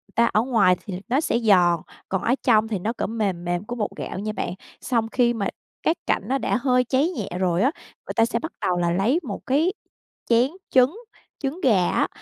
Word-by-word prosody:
ta 235 - +5
ở 215 - +4
ngoài 220 -7 +3
thì 185 -2 -5
nó 260 +4 +2
sẽ 235 - 0
giòn, 180 -7 +4 0.3
còn 190 - -1
ở 240 - +2
trong 225 -4 +4
thì 215 -4 -2
nó, 220 +6 -2
kiểu, - - -3
mềm 200 -6 -2
mềm 175 +1 -1
của 245 - -5
bột 215 -4 -2
gạo - - -5
nha 215 +1 -2
bạn. 180 - -3 0.3
Xong 230 -3 0
khi 240 -2 +3
mà 205 -4 -1 0.4
các 325 - +2
cạnh - - +2
nó 270 +3 +1
đã 250 - 0
hơi 250 -1 +3
cháy 275 +7 +2
nhẹ 225 - -4
rồi 180 -1 +1
á, 265 +5 +3 0.4
người - - -4
ta 225 - +4
sẽ 235 0 -1
bắt 320 +7 -5
đầu 180 - +1
là 175 -1 +1
lấy 210 - +2
một 210 -8 -5
cái 310 +8 +2 0.6
chén 240 +4 +4 0.2
trứng, 260 - +4 0.4
trứng 295 +6 -3
gà 200 - +3
á, - - +2
230 Hz, 225 wpm, -23 LUFS, 195-255 Hz, 0.6 s, ta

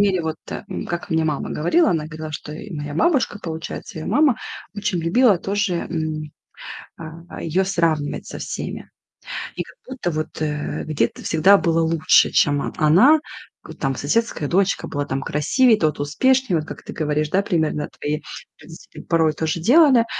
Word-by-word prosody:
мере, 190 -4 +2
вот, 160 -1 -3
э, - - -5 0.2
как 170 +2 -4
мне 160 -1 +2
мама 150 -2 -2
говорила, 320 - +2
она 160 -3 0
говорила, 155 0 -7
что 150 0 -6
и 195 +6 -9
моя 150 -1 -5
бабушка, 260 - +1
получается, 160 -1 -6
ее 155 - -6
мама, 275 +2 +3 0.4
очень 205 -3 -1
любила 195 +4 +4
тоже, 200 0 -1 0.2
м, 155 -2 -3 0.7
а, 165 +1 -9
ее 170 +4 +1
сравнивать 165 -6 0
со - - -8
всеми. - - -5 0.7
И - - -2
как - - -17
будто 255 -9 -3
вот, 155 0 -4
э, 150 -1 -2
где-то 155 -1 -1
всегда 180 +5 +5
было 165 -3 +1
лучше, 160 -1 +4
чем 145 -1 +3
о - - -4
она: 195 - +6 0.5
э, - - -7
там 135 -2 -2
соседская 155 - 0
дочка 195 +1 +1
была 145 0 -3
там 135 -1 -3
красивее, 220 - +3
тот 155 -2 0
успешней- 255 - +2
вот 155 -1 -1
как - - -9
ты - - -8
говоришь, 150 -1 -1
да, 190 +5 +2
примерно, 160 -6 -1
твои 150 +1 -2 0.4
родители - - -12
порой 160 -2 +2
тоже 160 +1 -2
делали. 260 - +6
165 Hz, 170 wpm, -21 LUFS, 155-200 Hz, 0.7 s, она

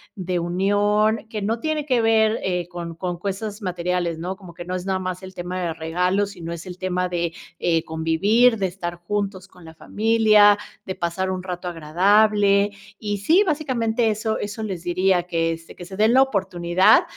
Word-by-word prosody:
de 180 -2 -2
unión, 205 +5 +1
que 215 -2 -4
no 225 +3 -1
tiene 310 0 -2
que 250 -3 +2
ver, 220 0 +3
eh, 180 -2 -1
con 170 -2 -7
con 175 0 -4
cosas 205 +3 -4
materiales, 180 -2 -2
¿no?, 180 +3 -4
como 180 -4 -13
que 175 - -8
no 180 +1 -3
es 185 +1 -5
nada 190 -1 0
más 185 0 -4
el 190 0 -10
tema 180 +1 -4
de 170 -2 -2
regalos, 180 +5 0
sino, 170 -2 -7
es 170 -1 -6
el 180 -1 -8
tema 180 -1 -1
de, 170 -1 -2 0.3
eh, 165 -2 +1
convivir, 195 +10 +2
de 190 -1 0
estar 175 -1 -5
juntos 195 +1 -4
con 180 -2 -17
la 160 - -11
familia, 215 +1 +4 0.3
de 190 - -4
pasar 175 +2 -2
un 185 -1 -3
rato 180 -1 -5
agradable. 200 +5 +3 0.3
Y 205 -1 -3
sí, 330 - +4
básicamente 245 -8 0
eso 220 +1 -2
eso 205 +2 -5
les 185 -5 -5
diría 180 0 +2
que, 165 -2 0
este, 165 0 -8
que 175 - -10
se 190 +2 -9
den 220 +2 +4
la 265 - +6
oportunidad 185 -6 +3
190 Hz, 190 wpm, -22 LUFS, 175-210 Hz, 0.3 s, la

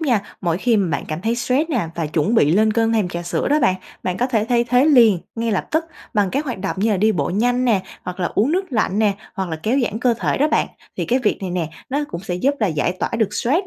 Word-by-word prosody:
nha, 255 -9 +2 0.2
mỗi 170 -3 0
khi 235 +3 +2
bạn 190 -6 0
cảm 155 +1 -3
thấy 230 +1 +1
stress 255 +6 0
nè 230 - 0
và 165 -2 -2
chuẩn 155 +9 0
bị 150 -9 +4
lên 215 +3 +3
cơn 225 0 +1
thèm 215 -5 +1
trà 175 0 -5
sữa 175 - -1
đó 295 +1 +3
bạn, 185 - +3 0.3
bạn 180 -1 -2
có 245 - +1
thể 225 -5 +1
thay 240 -1 +3
thế 250 +3 +3
liền, 235 - +6 0.2
ngay 230 -1 -1
lập 195 - -1
tức 320 +2 +1 0.3
bằng 205 -3 +2
cái 280 - 0
hoạt 255 -8 -4
động 195 +1 -3
như 220 +3 +2
là 205 - +2
đi 215 +3 +3
bộ 145 -5 -1
nhanh 245 +6 +1
nè, 215 -6 +2 0.2
hoặc 180 +1 -6
là 175 - +1
uống 235 +9 +2
nước 375 +3 +1
lạnh 215 -2 +1
nè, 210 -2 +3 0.2
hoặc 190 -2 -3
là 160 - -3
kéo 245 +5 +1
giãn 220 0 -3
cơ 245 -2 +3
thể - - 0
đó 295 +3 +3
bạn. - - +2 0.3
Thì - - -1
cái 250 - +1
việc 225 -5 0
này 190 -2 -4
nè, 175 -3 -2 0.2
nó 285 +3 -1
cũng 170 - -5
sẽ 180 -2 -3
giúp 270 +11 +1
là 215 - +3
giải 160 0 0
tỏa - - 0
được 215 -3 +1
stress 320 +11 +1
220 Hz, 285 wpm, -20 LUFS, 185-250 Hz, 0.3 s, liền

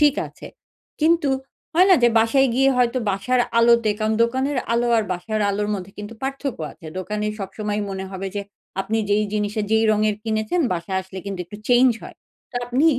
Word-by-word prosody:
ঠিক 295 -2 +5
আছে। - - -12 0.5
কিন্তু 315 -2 +3 0.4
হয় 365 +3 +6
না - - +9
যে 240 - +7
বাসায় 265 +4 +4
গিয়ে 270 +2 +4
হয়তো 250 0 +2
বাসার 245 +6 +1 0.2
আলোতে, 235 -1 +5
কারণ 220 0 +1
দোকানের 260 +4 0
আলো 240 +1 +2
আর 220 - 0
বাসার 215 +5 -3
আলোর 205 +1 -1
মধ্যে 190 0 -7
কিন্তু 205 +2 -7
পার্থক্য 270 - -3
আছে। 165 - -14
দোকানে 210 +3 -3
সবসময় 205 +1 -3
মনে 190 0 -4
হবে 195 0 -5
যে, 200 - -1 0.4
আপনি 220 +3 -1
যেই 210 +1 +3
জিনিসের 210 0 -1
যেই 220 0 +4
রঙের 215 0 +1
কিনেছেন 220 +9 0
বাসায় 180 +2 -2
আসলে 190 0 -9
কিন্তু 195 -2 -4
একটু 185 +5 -10
চেঞ্জ 250 +1 +6
হয়। - - -10 0.3
তো 245 - -6
আপনি 250 +5 +1
220 Hz, 185 wpm, -22 LUFS, 205-255 Hz, 0.5 s, না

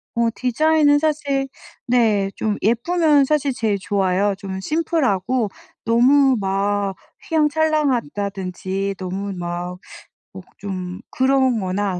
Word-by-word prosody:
어 235 0 +2
디자인은 290 +4 +3
사실 290 -3 0 0.4
네 220 -5 +2
좀 215 -2 -1
예쁘면 290 - +3
사실 285 -1 +1
제일 220 -4 0
좋아요. 195 0 +1
좀 190 -1 -6
심플하고 255 - 0 0.4
너무 260 +4 +4
막 200 0 -1 0.3
휘황찬란하다든지 205 - 0
너무 190 +2 -4
막 175 0 -5 0.6
목 185 -2 -9
좀 185 -2 -5
그런 260 -2 +2
거나 190 -1 -2
220 Hz, 220 characters per minute, -21 LUFS, 195-280 Hz, 0.6 s, 너무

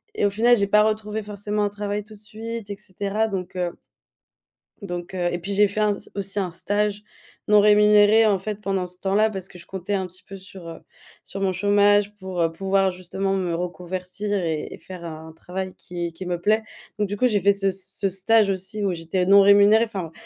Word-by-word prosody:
et - - +1
au - - +4
final, 235 +4 +4
j'ai 200 -1 +2
pas 210 +1 +5
retrouvé 215 0 -1
forcément 210 0 -3
un 205 - +1
travail 205 0 -4
tout 215 +1 -14
de - - -13
suite 220 +1 -7
et 200 - -5
cetera 205 +2 -2
donc 185 -3 -5
heu 175 -1 -3 1.0
donc 175 -2 -6
heu, 175 -2 0
et 175 - -2
puis, 195 +4 -4
j'ai 205 +1 +5
fait 200 +2 -4
un 210 -1 +2
s - - -11
aussi, 200 0 -2
un 185 -2 -1
stage 205 +4 -1 0.4
non 210 0 +6
rémunéré, 210 +1 +6
en 205 -3 +2
fait, 210 +1 -5
pendant 195 -3 -1
ce 180 - -6
temps-là 205 +3 +2
parce 190 -3 -6
que 180 - -14
je - - -13
comptais 190 +1 -5
un 190 -2 -1
petit 185 +1 -12
peu 195 - -10
sur, 190 -2 -11
heu, 165 - -8 0.4
sur 195 - -8
mon 195 -1 +1
chômage 205 +2 +3
pour, 190 -2 -4
heu, 165 -1 +2
pouvoir 195 +3 +1
justement 185 +2 -3
me 180 -3 -1
reconvertir 180 +3 -3
et 160 -2 -3
et - - -10
faire 185 -2 -10
un 160 0 -8
travail 185 +3 -6
qui 175 -1 -6
qui 185 +3 -8
me 175 -1 -2
plaît, 215 +3 +2 0.3
donc 210 -1 0
du 205 - -3
coup, 255 - +3
j'ai 210 -4 +1
fait 200 +3 +5
ce 195 0 0
c 190 0 -2
ce 195 - +1
stage 200 +3 +3
aussi 190 +2 -3
où 195 - +1
j'étais 165 +2 -2
non 200 +1 +8
rémunérée. 205 +2 +6
Enfin, 190 -7 -6
195 Hz, 225 wpm, -23 LUFS, 185-210 Hz, 1.0 s, non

